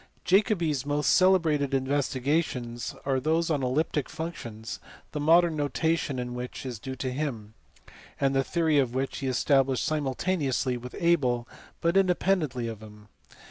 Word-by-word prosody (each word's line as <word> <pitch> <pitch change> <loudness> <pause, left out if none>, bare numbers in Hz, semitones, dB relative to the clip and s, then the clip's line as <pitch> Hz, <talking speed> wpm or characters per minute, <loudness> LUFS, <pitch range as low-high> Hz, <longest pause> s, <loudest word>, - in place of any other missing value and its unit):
Jacobi 190 -3 +3
s 135 -4 -2
most 145 -1 +1
celebrated 160 -7 +3
investigations 130 -2 -1
are 135 -1 +1
those 160 +4 +1
on 145 -3 +1
elliptic 140 +3 0
functions, 115 -9 -6 0.3
the 150 - -4
modern 165 +2 +4
notation 145 0 0
in 125 -1 -4
which 125 +2 -6
is 125 -4 -5
due 130 +3 -6
to 130 -1 -3
him, 125 -7 -4 0.7
and 135 -1 +2
the 135 0 +2
theory 160 -1 +2
of 130 -2 0
which 135 +1 -2
he 135 - -3
established 135 0 +2
simultaneously 145 -3 0
with 125 +1 -8
Abel 130 -9 +2 0.3
but 170 +1 +1
independently 180 -9 +1
of 110 -2 -6
him. 105 -1 -14
140 Hz, 145 wpm, -27 LUFS, 125-160 Hz, 0.7 s, modern